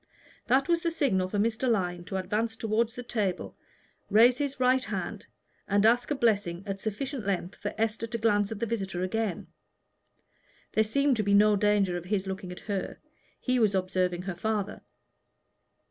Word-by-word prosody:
That 265 +3 +3
was 340 -1 +2
the 335 - +1
signal 255 - +1
for 205 - -2
Mr. 230 +4 +1
Lyon 180 -5 0
to 190 - -6
advance 210 +5 -1
toward 225 +1 0
the 245 +1 -8
table, 210 -6 -2 0.5
raise 235 +5 +6
his 280 -2 -2
right 255 0 +3
hand, - - -5 0.4
and 200 +1 +3
ask 245 +2 +4
a 295 - +1
blessing 200 -8 +1
at 195 -1 -4
sufficient 250 +4 -3
length 190 -2 -2
for - - -5
Esther 225 +1 -1
to 230 - -3
glance 205 -2 +2
at 220 - -5
the 230 - 0
visitor 195 -5 -3
again. 205 0 -2 1.3
There 220 - +4
seemed 275 +4 +2
to 215 - +1
be 200 0 +3
no 210 +1 +6
danger 200 -3 +2
of 175 - -7
his 195 0 -1
looking 190 -1 -5
at 180 - -9
her: 200 -3 -3 0.4
he 255 -1 +1
was 210 -4 +3
observing 185 -1 0
her 190 -2 -4
father. 210 +2 -2
210 Hz, 175 wpm, -28 LUFS, 190-235 Hz, 1.3 s, raise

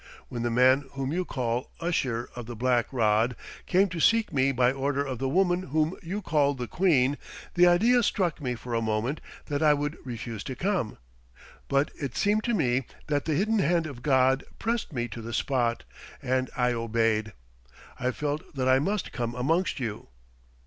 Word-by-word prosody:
When 120 - -4
the 120 - 0
man 130 +4 +4
whom 135 +1 -3
you 180 +1 -1
call 125 -3 -2
Usher 130 -8 -1
of 120 -2 -7
the 120 - -6
Black 120 0 +1
Rod 115 -1 +2 0.3
came 190 +2 +4
to 175 -1 -5
seek 225 +2 +3
me 135 0 +3
by 125 -1 +3
order 140 +1 -1
of 130 -4 -4
the 135 - -1
woman 180 +2 +2
whom 155 +5 +1
you 195 +4 -4
call 145 -4 +2
the 125 -2 -4
Queen, 145 -6 +2 0.3
the 180 0 +6
idea 230 +8 +5
struck 180 -7 0
me 125 -3 -2
for 120 +1 -7
a 115 - +1
moment 110 +6 -1 0.2
that 145 0 -2
I 150 -1 +5
would 145 +2 -3
refuse 115 -3 -6
to 130 - -4
come. 180 - -1 0.7
But 140 +1 +1
it 135 -4 -4
seemed 210 +2 +2
to 240 - +1
me 130 - +1 0.2
that 145 -2 0
the 155 - 0
hidden 215 +6 +2
hand 170 -1 +2
of 140 -5 -7
God 130 -1 +3
pressed 230 -4 -2
me 120 -4 -2
to 115 +1 -7
the 115 +1 -6
spot, 120 -3 0 0.4
and 130 0 0
I 125 -1 +2
obeyed. 115 -2 0 0.7
I 125 - 0
felt 145 +3 -4
that 130 -1 0
I 130 0 +5
must 195 +6 -1
come 120 -2 -3
amongst 160 +8 0
you. 110 -5 -4
135 Hz, 190 wpm, -27 LUFS, 120-165 Hz, 0.7 s, the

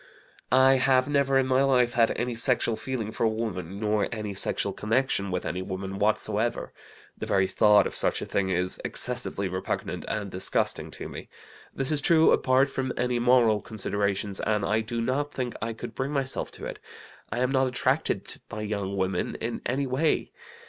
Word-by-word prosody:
"I 130 +1 +6
have 130 0 +3
never 140 -2 +2
in 135 - +3
my 130 0 +2
life 125 -3 +3
had 115 -1 +4
any 120 0 -1
sexual 120 -1 +2
feeling 110 -1 -4
for - - -3
a 115 - +4
woman, 100 -4 -4
nor 105 -1 +1
any 105 -3 -4
sexual 95 - 0
connection 110 -3 0
with 90 -1 -3
any 90 - -3
woman 95 +1 -5
whatsoever. 110 +2 0 0.4
The - - -6
very 95 -1 +2
thought 105 0 +5
of - - -3
such - - 0
a - - -4
thing 95 -1 -1
is 90 0 -1
excessively 100 0 0
repugnant 95 0 -4
and 105 -3 -3
disgusting 95 +1 0
to - - -7
me. - - -9 0.4
This 135 +2 -2
is 150 -2 +2
true, 160 +1 +5
apart 130 +2 +3
from 130 -1 -2
any 125 0 0
moral 120 -3 +4
considerations, 100 -2 -2
and 105 -2 0
I 110 +2 +1
do 115 +1 -3
not 140 +5 -1
think 125 -2 -3
I 115 - -2
could 115 +1 -8
bring 135 +2 -3
myself 135 -2 -1
to - - -8
it. - - -6 0.5
I 110 - -3
am 125 +1 +1
not 130 -1 +2
attracted 125 - -1
by 105 - -5
young 100 -2 -3
women 95 -1 -1
in 115 +1 -4
any 135 +3 0
way. 135 +5 0
115 Hz, 185 wpm, -27 LUFS, 100-130 Hz, 0.5 s, I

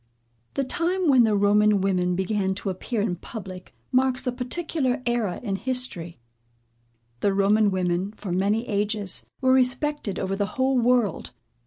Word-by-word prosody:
The 275 - +1
time 350 +6 -1
when 255 -4 +6
the 215 -2 +2
Roman 205 +1 +4
women 180 -2 +1
began 190 0 -1
to 195 0 -3
appear 210 +4 -3
in 190 -4 -1
public, 185 -2 -9 0.2
marks 260 0 +2
a 250 - +1
particular 255 0 -2
era 235 -7 -1
in 195 -4 -2
history. 245 - -3 1.0
The 195 +8 +1
Roman 205 +2 +3
women, 185 0 -1
for 210 -3 -7
many 205 +6 0
ages, 205 -2 -1
were 260 0 +4
respected 260 -2 0
over 195 0 -2
the 200 0 -1
whole 260 0 +2
world. 240 -3 +1
210 Hz, 150 wpm, -25 LUFS, 195-255 Hz, 1.0 s, when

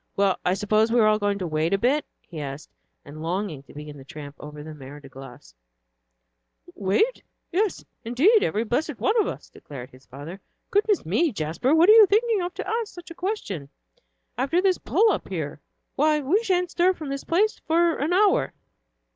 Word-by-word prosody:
"Well, 195 -1 +2
I 180 - +1
suppose 215 +2 +2
we 240 - +3
are 220 - +5
all 215 0 +3
going 205 -1 0
to 190 - -4
wait 160 +3 0
a - - +1
bit?" 265 +8 +1 0.2
he 160 -4 -7
asked, 140 +1 -7 0.3
and 150 +1 -10
longing 170 -2 -3
to 135 - -18
begin 150 -1 -9
the - - -11
tramp 145 +1 -10
over 150 0 -9
the 155 0 -9
Mer 145 0 -11
de 140 - -13
Glace. 135 - -13 1.2
"Wait? 210 - 0 0.3
Yes, 395 +3 -1 0.2
indeed, 300 - +4
every 215 - 0
blessed 250 +4 -2
one 420 - +1
of - - -1
us," - - -6
declared 135 -2 -10
his 130 0 -19
father. 145 +9 -9 0.3
"Goodness 410 0 +2
me, 275 - +1
Jasper, 170 - 0
what 330 +2 +5
are 425 - +9
you 440 -2 +8
thinking 435 +1 +2
of 350 0 -3
to - - -5
ask 450 -1 -2
such 350 -1 -11
a - - -6
question, 330 - -4 0.7
after 275 +7 +1
this 375 -1 +2
pull 445 -1 +3
up - - -3
here? 155 -6 -5 0.4
Why, 300 +1 +3
we 310 +10 +1
sha'n't 360 -5 0
stir 365 +2 +3
from 310 -5 -8
this 275 0 -4
place 405 +6 +1
for 335 0 +3
an 295 +5 -1
hour." 395 +2 +3
230 Hz, 195 wpm, -24 LUFS, -, 1.2 s, are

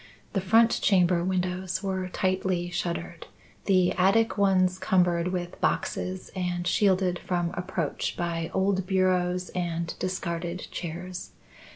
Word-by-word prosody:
The 195 - +1
front 225 +5 +4
chamber 180 -3 +3
windows 185 0 -1
were 190 -1 -2
tightly 185 -1 -1
shuttered, 175 - -4 0.4
the 185 -2 +4
attic 195 +5 +3
ones 185 -2 +3
cumbered 180 -2 +2
with 180 -1 -4
boxes 185 0 -1
and 180 -1 -2
shielded 185 -1 +2
from 175 -2 -1
approach 175 -4 -3
by 170 -1 -2
old 190 -1 +1
bureaus 180 -1 +1
and 170 -2 -2
discarded 175 -1 -3
chairs. 180 +2 -6
180 Hz, 115 wpm, -27 LUFS, 175-190 Hz, 0.4 s, front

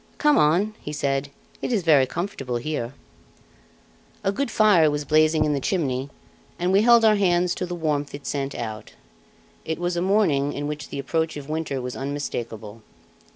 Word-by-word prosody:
"Come 295 -1 +4
on," 175 +8 +3
he 150 - -6
said, 140 -1 -1 0.3
"it - - -2
is 215 -6 +1
very 145 -5 +5
comfortable 150 -8 -4
here." 125 -1 -4 1.3
A 195 - +2
good 275 +5 -2
fire 205 -8 +5
was 145 0 -2
blazing 155 +1 +3
in 150 - +1
the 140 - 0
chimney, 135 -4 -1 0.5
and 180 +1 0
we 195 +2 +5
held 235 0 +6
our 215 -1 +5
hands 180 -2 +2
to 180 - -4
the 175 - -4
warmth 150 -4 -2
it 140 - -11
sent 140 -1 -3
out; 110 -2 -6 0.7
it 160 - -3
was 175 0 -2
a 170 - -1
morning 175 -8 +2
in 145 - -4
which 150 0 -5
the - - -6
approach 160 +3 -1
of 145 0 -9
winter 155 -3 -2
was 125 0 -5
unmistakable. 115 -6 -5
155 Hz, 180 wpm, -24 LUFS, 140-180 Hz, 1.3 s, held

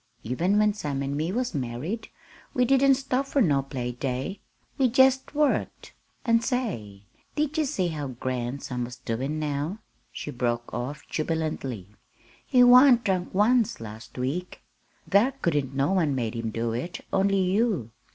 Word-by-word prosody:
"Even 170 - +1
when 210 0 +4
Sam 145 -8 -3
an' 140 +1 -2
me 155 +4 -1
was 245 +4 -1
married 145 - -3 0.5
we 250 - +3
didn't 270 +1 +5
stop 270 0 -1
fur 280 - 0
no 145 - +3
play 130 -3 -4
day. 130 +9 -3 0.4
We 260 -2 +4
jest 265 +3 +3
worked. 295 -2 0 0.3
An' 230 -1 +4
say, 185 - -3 0.3
did 300 0 0
ye 315 -2 +2
see 195 -11 -1
how 150 -3 -4
grand 125 +1 -4
Sam 125 -1 -3
was 125 0 -8
doin' 130 +8 -3
now?" 150 +4 -2 0.3
she 150 - -6
broke 120 -2 -2
off 125 +6 -5
jubilantly. 155 - -3 0.6
"He 250 -1 +4
wa'n't 250 0 +7
drunk 185 -3 0
once 225 +3 +3
last 110 +1 -10
week! 140 +9 -3 0.4
Thar 215 +7 +4
couldn't 145 - -1
no 140 +5 +1
one 165 -7 +2
made 115 -4 -2
him 115 -1 -3
do 115 +1 -2
it 130 +10 -5
only 195 0 +3
you. 190 - +1
160 Hz, 160 wpm, -26 LUFS, -, 0.6 s, wa'n't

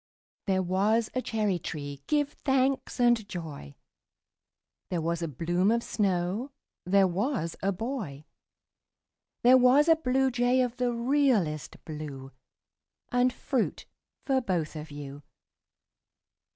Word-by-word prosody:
There 190 -1 +2
was 210 +5 +1
a 255 - 0
cherry 210 -7 -1
tree, 145 -3 -6
give 290 -1 +1
thanks 265 -1 0
and 240 -4 +3
joy! 155 - -7 1.1
There 175 - -1
was 170 +1 -1
a 165 - -1
bloom 175 - 0
of 235 +1 +1
snow 195 +4 -1 0.4
There 195 +1 +5
was 190 - -1
a 195 - +1
boy 195 - -5 1.2
There 255 +2 +7
was 260 +5 +5
a 325 - +7
bluejay 255 -3 +2
of 245 0 -7
the 250 -1 +1
realest 235 - 0
blue 145 -4 -7 0.8
And 245 +1 +3
fruit 255 -1 -2 0.4
for 265 -2 +2
both 175 -9 -2
of 155 0 -7
you. 145 -1 -8
205 Hz, 120 wpm, -28 LUFS, 165-250 Hz, 1.2 s, There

